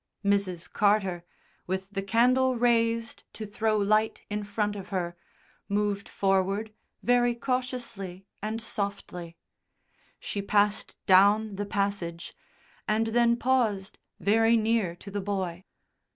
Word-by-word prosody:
Mrs. 200 -4 +1
Carter, 200 -4 +2 0.4
with 190 +1 -2
the 195 -1 -2
candle 250 +6 +3
raised 230 -1 +1
to 220 - -6
throw 215 +1 0
light 215 +2 +1
in 210 0 -2
front 205 0 -1
of 195 -2 -8
her, 175 -2 -2 0.5
moved 205 0 -1
forward 195 +2 0 0.3
very 245 0 +3
cautiously 235 -7 -3 0.2
and 215 +2 -3
softly. 200 -6 -5 0.8
She 200 - -4
passed 205 +1 +1
down 205 +2 +5
the 205 0 -3
passage, 195 -5 -2 0.5
and 220 +1 +2
then 235 0 +4
paused 230 -7 0 0.2
very 225 +3 +4
near 220 -5 +1
to 200 +3 -11
the 205 0 -2
boy. 190 -2 -3
205 Hz, 120 wpm, -28 LUFS, 195-225 Hz, 0.8 s, down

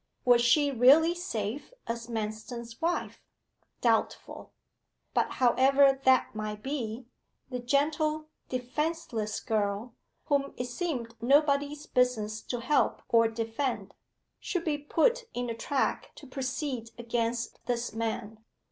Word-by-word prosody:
Was 245 -1 +6
she 285 +4 +4
really 280 +7 +6
safe 280 - -4
as 230 0 -4
Manston's 225 +1 -5
wife? 340 +2 -1 0.6
Doubtful. - - 0 0.6
But, - - +1
however 270 +2 +4
that 260 -1 +4
might 215 0 -5
be, 250 -4 -3 0.5
the 250 - -2
gentle, 305 +4 +1 0.2
defenceless 255 -3 -2
girl, 215 +1 -1 0.3
whom 280 -2 0
it 245 - -2
seemed 245 -3 -3
nobody's 285 +3 +2
business 220 -5 +1
to 245 -2 -4
help 290 +5 +1
or 230 -1 +5
defend, 225 +3 -3 0.5
should 360 -3 -2
be 295 -2 0
put 455 +12 +2
in 245 -1 -2
a - - -4
track 270 +4 -1
to 295 - -12
proceed 260 -2 -3
against 235 0 -2
this 240 -2 -1
man. 220 -1 -4
250 Hz, 120 wpm, -29 LUFS, 230-285 Hz, 0.6 s, Was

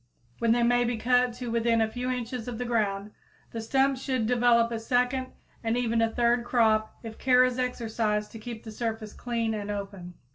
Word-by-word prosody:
Then 230 -1 +2
they 240 +1 +3
may 245 +1 +3
be 240 -1 -1
cut 250 +2 +2
to 240 0 -6
within 230 0 +2
a 220 - +3
few 245 +3 -4
inches 250 -1 -4
of 240 -2 -4
the 245 - -3
ground. 210 -3 -1 0.4
The 225 - -4
stumps 265 +3 +1
should 255 -4 -1
develop 235 0 +3
a 230 - -2
second 250 +3 0 0.4
and 225 +1 0
even 230 -2 +1
a 225 - +3
third 235 +1 +2
crop 220 -3 +2
if 225 -1 -8
care 255 -1 +5
is 255 0 0
exercised 220 -4 -1
to 225 - -9
keep 225 0 -8
the 220 - -8
surface 220 -1 -4
clean 230 -2 -2
and 210 -1 -4
open. 195 -3 -6
235 Hz, 205 wpm, -27 LUFS, 220-245 Hz, 0.4 s, care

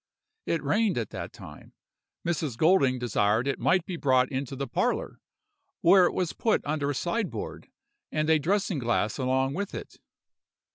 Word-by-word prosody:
It 165 -3 0
rained 205 - +1
at 115 -3 -3
that - - -6
time; - - -13 0.5
Mrs. 155 -7 -2
Golding 155 -6 +4
desired 115 0 +1
it 140 - -1
might 185 -1 +2
be 180 - -5
brought 130 -3 +2
into 135 0 -3
the 140 +1 -3
parlor, - - -1 0.6
where 180 +1 +6
it - - -3
was 180 -3 -1
put 225 - 0
under 145 -1 -1
a 145 - -1
sideboard, 195 - -3 0.4
and 155 0 0
a 160 -1 +4
dressing 190 +1 0
glass 115 -2 0
along 130 +1 +1
with 200 +5 -4
it. - - -9
145 Hz, 160 wpm, -27 LUFS, 130-180 Hz, 0.6 s, where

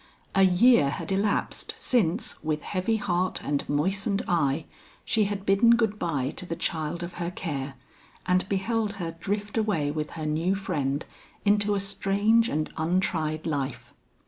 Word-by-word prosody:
A 195 - +4
year 190 - +5
had 170 - -4
elapsed 200 +2 0
since, 215 -4 +1
with 155 -1 -1
heavy 200 +4 0
heart 185 -2 0
and 145 -1 -2
moistened 195 +7 +1
eye, 155 -3 +1 0.4
she 215 -2 +2
had 200 -1 -3
bidden 200 +4 +5
good 220 -3 0
bye 145 -5 -1
to - - -3
the 165 - -3
child 160 +1 -2
of 175 - -6
her 170 - -1
care, 140 -6 -4 0.5
and 185 +1 +1
beheld 210 +2 0
her 170 -5 -5
drift 205 +4 -2
away 165 -10 0
with 150 0 -3
her 155 - -4
new 165 +5 +1
friend 145 -8 -2 0.4
into 205 0 +3
a - - 0
strange 205 +4 +2
and 155 0 -2
untried 160 -2 0
life. 140 -5 -3
180 Hz, 155 wpm, -27 LUFS, 155-205 Hz, 0.5 s, year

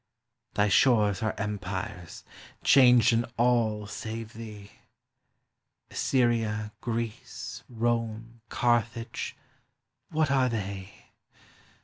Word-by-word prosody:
Thy 105 0 +3
shores 105 -2 +4
are 110 -1 -1
empires, 100 -2 -5 0.4
changed 125 -3 +6
in 115 +1 +2
all 115 -3 +2
save 110 +2 -6
thee; 105 -3 -9 1.2
Assyria, 115 -4 +1
Greece, 115 -2 -5
Rome, 115 -1 -2
Carthage, 120 -1 0 0.7
what 155 -2 +1
are 130 -2 +3
they? 100 -4 -6
115 Hz, 80 wpm, -28 LUFS, 105-120 Hz, 1.2 s, changed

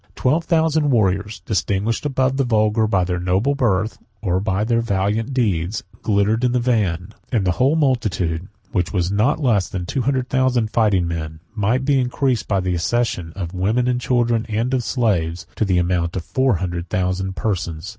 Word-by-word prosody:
Twelve 155 +6 +1
thousand 160 -3 +2
warriors, 105 -3 +1
distinguished 105 +5 -1
above 135 -1 0
the 140 - +2
vulgar 110 -2 +2
by 95 -3 +2
their 90 0 -2
noble 95 +10 +1
birth, 110 -6 0 0.2
or 95 -2 +1 0.2
their 115 0 +2
valiant 105 +2 -1
deeds, 105 -7 0 0.2
glittered 105 +2 +1
in 125 -1 +2
the 125 - +2
van; 105 -8 0 0.2
68 120 - -1
and 100 - 0
the 90 - +3
whole 130 - +2
multitude, 95 - 0 0.2
which 90 -4 0
was 90 -2 0
not 110 +10 +2
less 110 - +2
than 90 -2 -4
two 130 - -2
hundred 130 0 0
thousand 130 -4 +1
fighting 100 -6 +2
men, 80 -2 -4
might 115 +5 0
be 140 -1 +3
increased, 125 0 0
by 100 - +1
the 90 -1 -1
accession 90 -1 -1
of 90 -3 -5
women, 105 +7 +1
of 125 -1 +1
children, 120 -3 +1
and 115 +4 -1
of 130 -2 +1
slaves, 90 -10 0
to - - 0
the 95 -2 +1
amount 85 -1 0
of 90 - -4
four 130 -4 +2
hundred 85 0 -4
thousand 95 +1 -1
persons. 85 -4 -3
105 Hz, 185 wpm, -21 LUFS, 90-125 Hz, 0.2 s, the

